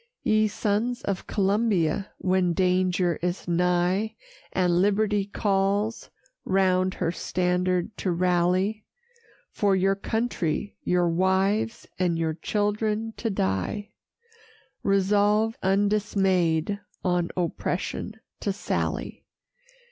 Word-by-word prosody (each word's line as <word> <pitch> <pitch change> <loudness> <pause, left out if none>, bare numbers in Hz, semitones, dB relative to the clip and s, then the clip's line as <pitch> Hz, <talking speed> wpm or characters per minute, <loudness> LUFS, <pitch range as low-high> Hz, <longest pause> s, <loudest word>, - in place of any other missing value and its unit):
Ye 215 0 +3
sons 215 +4 -1
of 195 -2 -3
Columbia, 200 -3 +1
when 185 -2 +1
danger 180 -1 +1
is 180 +1 -2
nigh, 180 +5 +1 0.4
And 180 -1 +2
liberty 205 0 +2
calls, 200 +2 0 0.3
round 185 -1 +2
her 165 - -1
standard 180 +2 -1
to 190 - -2
rally, 180 +4 +1 0.7
For 200 -2 +2
your 190 +1 +3
country, 205 -3 -2
your 180 -1 +2
wives, 190 +6 +1
and 175 -2 +1
your 160 -1 0
children 210 +5 -1
to 230 - -2
die, 95 - -2 0.9
Resolve 205 +3 +2
undismay'd 195 -3 +1 0.3
on 180 -1 +1
oppression 180 +4 -2 0.2
to 200 - -1
sally. 200 - -3
190 Hz, 95 wpm, -26 LUFS, 180-205 Hz, 0.9 s, Ye